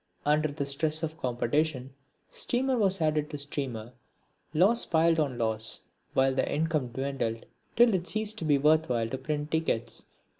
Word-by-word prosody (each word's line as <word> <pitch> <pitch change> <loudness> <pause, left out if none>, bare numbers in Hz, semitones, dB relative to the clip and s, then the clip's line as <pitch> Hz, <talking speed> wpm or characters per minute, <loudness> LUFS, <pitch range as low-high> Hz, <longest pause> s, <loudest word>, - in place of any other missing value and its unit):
Under 150 +1 +3
the 145 -1 -4
stress 155 +3 +2
of 160 0 -4
competition 130 +2 -1 0.3
steamer 260 +2 0
was 195 -5 +1
added 155 -1 +1
to 150 - -5
steamer, 130 -5 -4 0.6
loss 195 +10 +4
piled 165 0 +2
on 140 -5 -1
loss, 110 -1 0 0.3
while 135 0 +3
the 130 - -1
income 155 -3 0
dwindled 120 -2 -3 0.3
till 235 -1 +5
it 180 -1 -1
ceased 215 0 -2
to - - -5
be 145 -2 +4
worth 155 +2 +3
while 115 -2 0
to 130 - -4
print 150 +2 -3
tickets. 120 -8 -2
150 Hz, 160 wpm, -28 LUFS, 130-160 Hz, 0.6 s, till